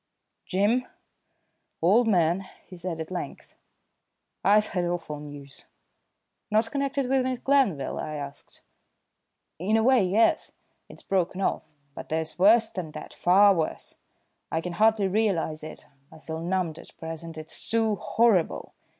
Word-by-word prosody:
"Jim, 210 Hz, +7 st, +1 dB, 0.9 s
old 215 Hz, +8 st, +4 dB
man," 180 Hz, -1 st, +2 dB, 0.2 s
he 185 Hz, -, -12 dB
said 175 Hz, -2 st, -5 dB
at 160 Hz, +2 st, -6 dB
length, 180 Hz, -, -6 dB, 0.9 s
"I've 210 Hz, +1 st, +4 dB
had 180 Hz, -2 st, -1 dB
awful 170 Hz, -4 st, -3 dB
news." 145 Hz, -2 st, -10 dB, 0.8 s
"Not 220 Hz, +2 st, +2 dB
connected 275 Hz, -1 st, -1 dB
with 265 Hz, +1 st, +2 dB
Miss 255 Hz, 0 st, -1 dB
Glanville?" 245 Hz, -, +1 dB
I 155 Hz, 0 st, -4 dB
asked. 140 Hz, -1 st, -9 dB, 1.0 s
"In 205 Hz, +6 st, +2 dB
a 220 Hz, -, +2 dB
way, 255 Hz, -3 st, +5 dB
yes. 200 Hz, +5 st, +2 dB, 0.4 s
It's -, -, -12 dB
broken 185 Hz, -1 st, -1 dB
off, -, -, 0 dB, 0.3 s
but -, -, -9 dB
there's 160 Hz, +2 st, -3 dB
worse 220 Hz, +4 st, +5 dB
than 180 Hz, -4 st, -5 dB
that -, -, -9 dB
far 200 Hz, +3 st, +5 dB
worse. 165 Hz, -4 st, -3 dB, 0.6 s
I 160 Hz, -, 0 dB
can 175 Hz, +1 st, -5 dB
hardly 215 Hz, +1 st, +3 dB
realise 190 Hz, -6 st, 0 dB
it; 155 Hz, 0 st, -9 dB, 0.3 s
I -, -, -13 dB
feel 160 Hz, +1 st, -6 dB
numbed 170 Hz, -2 st, -2 dB
at -, -, -15 dB
present; 165 Hz, 0 st, -7 dB
it's 155 Hz, 0 st, -5 dB
too 220 Hz, -2 st, +1 dB
horrible. 220 Hz, -6 st, +1 dB
185 Hz, 140 wpm, -26 LUFS, 160-220 Hz, 1.0 s, way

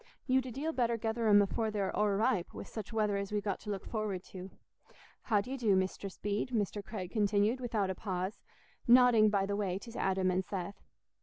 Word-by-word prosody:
You'd 260 Hz, -1 st, +2 dB
a -, -, -5 dB
deal 295 Hz, +7 st, -3 dB
better 235 Hz, -3 st, +1 dB
gether 225 Hz, +1 st, -1 dB
'em 205 Hz, -1 st, +7 dB
afore 220 Hz, +3 st, -1 dB
they're 205 Hz, -3 st, -2 dB
o'erripe, 210 Hz, -1 st, +1 dB
wi' -, -, -5 dB
such 220 Hz, -1 st, -7 dB
weather 210 Hz, -2 st, +1 dB
as 200 Hz, 0 st, -4 dB
we've 210 Hz, -1 st, -1 dB
got 200 Hz, -3 st, -2 dB
to 210 Hz, -, -9 dB
look 200 Hz, -2 st, -4 dB
forward 210 Hz, -5 st, -3 dB
to. 185 Hz, 0 st, -7 dB, 0.7 s
How 210 Hz, -4 st, +2 dB
do 250 Hz, -, -8 dB
ye 270 Hz, -, -2 dB
do, 220 Hz, -6 st, +3 dB
Mistress 190 Hz, +1 st, -2 dB
Bede?" 205 Hz, +4 st, -2 dB
Mr. 210 Hz, -3 st, -1 dB
Craig 190 Hz, -4 st, -6 dB
continued, 210 Hz, +3 st, +2 dB
without 220 Hz, -6 st, -1 dB
a -, -, -2 dB
pause, 185 Hz, +1 st, -4 dB, 0.5 s
nodding 240 Hz, -3 st, +7 dB
by 200 Hz, -2 st, +1 dB
the 200 Hz, 0 st, -2 dB
way 195 Hz, -3 st, -1 dB
to 230 Hz, +4 st, -10 dB
Adam 190 Hz, -1 st, +1 dB
and 185 Hz, +1 st, 0 dB
Seth. 190 Hz, 0 st, -5 dB
205 Hz, 210 wpm, -32 LUFS, 195-230 Hz, 0.7 s, em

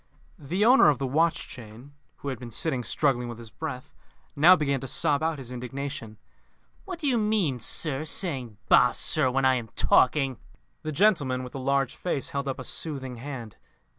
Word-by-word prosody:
The 180 Hz, +9 st, -1 dB
owner 250 Hz, -, +7 dB
of 145 Hz, -, +2 dB
the 135 Hz, -, -3 dB
watch 160 Hz, +6 st, +1 dB
chain, 120 Hz, +3 st, -12 dB, 0.2 s
who 140 Hz, -, -6 dB
had 130 Hz, -, -5 dB
been 120 Hz, -2 st, -8 dB
sitting 125 Hz, +2 st, -1 dB
struggling 125 Hz, -3 st, 0 dB
with 120 Hz, -, -7 dB
his 115 Hz, -2 st, -11 dB
breath, 125 Hz, +3 st, -7 dB, 0.4 s
now 170 Hz, +6 st, +7 dB
began 140 Hz, -5 st, -1 dB
to 135 Hz, -, -7 dB
sob 145 Hz, +2 st, +3 dB
out 160 Hz, -1 st, -1 dB
his 130 Hz, -3 st, -8 dB
indignation. 125 Hz, -2 st, -6 dB, 0.7 s
"What 375 Hz, -3 st, -6 dB
do 330 Hz, -, -6 dB
you 245 Hz, -4 st, +2 dB
mean, 210 Hz, -, 0 dB
sir? 145 Hz, +4 st, 0 dB
Saying 135 Hz, -, -1 dB
Bah! -, -, +5 dB
sir, 130 Hz, -, +2 dB
when 135 Hz, +1 st, 0 dB
I 130 Hz, -, +5 dB
am 120 Hz, -3 st, -3 dB
talking 135 Hz, -2 st, +2 dB, 0.2 s
" -, -, -44 dB
The 155 Hz, -, -4 dB
gentleman 145 Hz, -8 st, +2 dB
with 125 Hz, -, -9 dB
the 135 Hz, -, -5 dB
large 135 Hz, 0 st, 0 dB
face 160 Hz, -7 st, -3 dB
held 140 Hz, 0 st, -4 dB
up 135 Hz, -, -3 dB
a 130 Hz, -, -7 dB
soothing 130 Hz, -4 st, -4 dB
hand. 120 Hz, -4 st, -8 dB
135 Hz, 195 wpm, -26 LUFS, 125-155 Hz, 0.7 s, owner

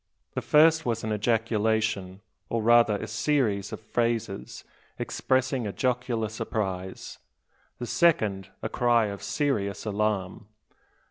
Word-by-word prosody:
The -, -, -2 dB
first 160 Hz, +1 st, +5 dB
was 115 Hz, -4 st, -2 dB
an 110 Hz, 0 st, -1 dB
ejaculation, 110 Hz, -3 st, 0 dB, 0.3 s
or 115 Hz, -1 st, -1 dB
rather 115 Hz, -1 st, +5 dB
a 105 Hz, -, -4 dB
series 115 Hz, -3 st, 0 dB
of -, -, -5 dB
phrases 115 Hz, -3 st, -2 dB, 0.3 s
expressing 130 Hz, -2 st, 0 dB
a -, -, -3 dB
jocular 125 Hz, -2 st, -1 dB
surprise, 95 Hz, -4 st, -4 dB, 0.6 s
the 120 Hz, -, -5 dB
second 110 Hz, -, +2 dB
a -, -, 0 dB
cry 120 Hz, -2 st, +2 dB
of 100 Hz, 0 st, -7 dB
serious 110 Hz, -11 st, -1 dB
alarm. 105 Hz, -1 st, -2 dB
110 Hz, 120 wpm, -27 LUFS, 100-120 Hz, 0.6 s, first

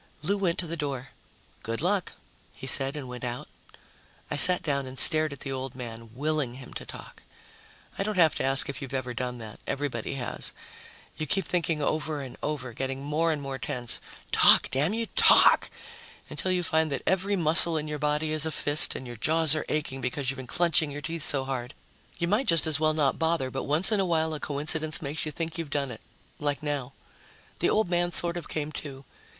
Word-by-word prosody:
Lou 195 Hz, +6 st, +1 dB
went 185 Hz, -4 st, 0 dB
to 180 Hz, -, 0 dB
the 165 Hz, 0 st, -4 dB
door. 140 Hz, -5 st, -4 dB, 0.5 s
"Good 115 Hz, +1 st, -4 dB
luck," 185 Hz, +3 st, 0 dB, 0.4 s
he -, -, -9 dB
said, 135 Hz, +1 st, +2 dB
and 140 Hz, -3 st, -6 dB
went 125 Hz, 0 st, -8 dB
out. 125 Hz, 0 st, -4 dB, 0.8 s
I -, -, 0 dB
sat 180 Hz, +4 st, +6 dB
down 140 Hz, -3 st, -1 dB
and 130 Hz, +1 st, -9 dB
stared 155 Hz, 0 st, +6 dB
at 140 Hz, -, -9 dB
the 135 Hz, -, -5 dB
old 130 Hz, -1 st, -5 dB
man, 115 Hz, -2 st, -8 dB
willing 150 Hz, -2 st, -1 dB
him 130 Hz, -1 st, -11 dB
to -, -, -8 dB
talk. -, -, -11 dB, 0.8 s
I -, -, +1 dB
don't 210 Hz, 0 st, -2 dB
have 160 Hz, -4 st, +5 dB
to -, -, -1 dB
ask 135 Hz, 0 st, +2 dB
if 140 Hz, 0 st, -5 dB
you've 135 Hz, -1 st, -6 dB
ever 125 Hz, -2 st, -3 dB
done 125 Hz, 0 st, -4 dB
that; 110 Hz, -2 st, -10 dB
everybody 140 Hz, -3 st, -3 dB
has. 125 Hz, -3 st, -3 dB, 0.6 s
You 155 Hz, -, -3 dB
keep 190 Hz, +4 st, +1 dB
thinking 165 Hz, -3 st, 0 dB
over 155 Hz, 0 st, -1 dB
and 130 Hz, -3 st, -8 dB
over, 130 Hz, -5 st, -4 dB
getting 135 Hz, +2 st, -4 dB
more 155 Hz, +3 st, 0 dB
and 150 Hz, -2 st, -3 dB
more 135 Hz, -1 st, -5 dB
tense, 120 Hz, -1 st, 0 dB, 0.3 s
"Talk, -, -, +5 dB
damn 150 Hz, +10 st, +1 dB
you, 230 Hz, 0 st, -1 dB
talk!" -, -, +6 dB, 0.6 s
until 185 Hz, -, -2 dB
you 180 Hz, -1 st, 0 dB
find 160 Hz, -2 st, +1 dB
that 135 Hz, -, -3 dB
every 190 Hz, +2 st, +1 dB
muscle 165 Hz, -1 st, +4 dB
in 155 Hz, 0 st, -3 dB
your 150 Hz, -1 st, -4 dB
body 150 Hz, +1 st, 0 dB
is 155 Hz, 0 st, +3 dB
a -, -, -3 dB
fist 145 Hz, 0 st, +3 dB
and 130 Hz, -, -6 dB
your 120 Hz, -1 st, -8 dB
jaws 160 Hz, +5 st, +4 dB
are 155 Hz, -, -3 dB
aching 135 Hz, -3 st, -2 dB
because 130 Hz, +1 st, -2 dB
you've 135 Hz, -, -8 dB
been 130 Hz, -1 st, -8 dB
clenching 170 Hz, +2 st, +3 dB
your 145 Hz, +1 st, -6 dB
teeth 165 Hz, +2 st, -4 dB
so 135 Hz, -2 st, +1 dB
hard. 130 Hz, 0 st, -5 dB, 0.4 s
You 170 Hz, -, -1 dB
might 210 Hz, +8 st, +1 dB
just 165 Hz, -3 st, +4 dB
as 155 Hz, -2 st, +3 dB
well 155 Hz, 0 st, +2 dB
not 145 Hz, -3 st, +1 dB
bother, 160 Hz, -5 st, 0 dB
but 135 Hz, -, -4 dB
once 155 Hz, +9 st, +3 dB
in 210 Hz, -, +2 dB
a 195 Hz, -, +2 dB
while 160 Hz, -2 st, 0 dB
a 155 Hz, -, -4 dB
coincidence 155 Hz, +2 st, 0 dB
makes 150 Hz, +2 st, -4 dB
you -, -, -3 dB
think 165 Hz, +2 st, -5 dB
you've 165 Hz, -3 st, -4 dB
done 140 Hz, -2 st, -2 dB
it. 110 Hz, -, -9 dB, 0.4 s
Like 145 Hz, 0 st, -2 dB
now. 140 Hz, -3 st, -3 dB, 0.7 s
The -, -, +2 dB
old 215 Hz, -1 st, +2 dB
man 175 Hz, 0 st, 0 dB
sort 170 Hz, 0 st, 0 dB
of 175 Hz, -3 st, -6 dB
came 155 Hz, -1 st, -3 dB
to. 135 Hz, -2 st, -10 dB
150 Hz, 215 wpm, -27 LUFS, 135-165 Hz, 0.8 s, sat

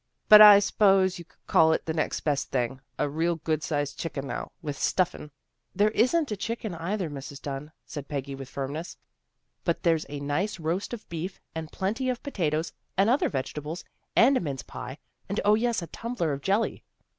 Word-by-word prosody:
" -, -, -47 dB
But 215 Hz, 0 st, +11 dB
I 210 Hz, -1 st, +11 dB
s'pose 195 Hz, -2 st, +3 dB
you 170 Hz, -, -9 dB
could -, -, -32 dB
call 160 Hz, 0 st, +5 dB
it -, -, -2 dB
the 160 Hz, -, -2 dB
next 155 Hz, -1 st, -1 dB
best 145 Hz, -3 st, -1 dB
thing. 130 Hz, +1 st, -1 dB, 0.2 s
A -, -, +1 dB
real 165 Hz, +4 st, 0 dB
good 155 Hz, -1 st, -1 dB
sized 145 Hz, -2 st, -2 dB
chicken 145 Hz, -4 st, -4 dB
now, -, -, -5 dB
with 145 Hz, -2 st, -4 dB
stuffin' 180 Hz, -1 st, 0 dB, 0.2 s
" 115 Hz, +8 st, -47 dB
There 205 Hz, +2 st, +3 dB
isn't 265 Hz, +6 st, +2 dB
a -, -, 0 dB
chicken 225 Hz, 0 st, -4 dB
either, 175 Hz, +3 st, -2 dB
Mrs. 140 Hz, -1 st, -8 dB
Dunn," 145 Hz, +1 st, -6 dB
said 145 Hz, -3 st, -7 dB
Peggy 140 Hz, -1 st, -4 dB
with 135 Hz, -1 st, -8 dB
firmness. 140 Hz, +6 st, -5 dB, 0.3 s
" -, -, -51 dB
But -, -, -1 dB
there's 165 Hz, -3 st, +2 dB
a 145 Hz, 0 st, -5 dB
nice 145 Hz, +9 st, -1 dB
roast 165 Hz, +5 st, -2 dB
of 215 Hz, -, -14 dB
beef, 170 Hz, +3 st, -5 dB
and 160 Hz, -1 st, -6 dB
plenty 225 Hz, +7 st, -1 dB
of 250 Hz, -1 st, -3 dB
potatoes, 165 Hz, -, -1 dB, 0.2 s
and 200 Hz, +4 st, +4 dB
other 265 Hz, -, +2 dB
vegetables, 150 Hz, +4 st, -4 dB, 0.3 s
and 265 Hz, +4 st, +6 dB
a -, -, +2 dB
mince 140 Hz, -6 st, -4 dB
pie, 130 Hz, +2 st, -8 dB, 0.3 s
and, 200 Hz, -, -2 dB
0, 210 Hz, -, +6 dB
yes, 225 Hz, -3 st, +1 dB
a -, -, -4 dB
tumbler 230 Hz, -10 st, -2 dB
of 140 Hz, -, -5 dB
jelly." 200 Hz, +8 st, 0 dB
165 Hz, 200 wpm, -27 LUFS, 145-205 Hz, 0.3 s, But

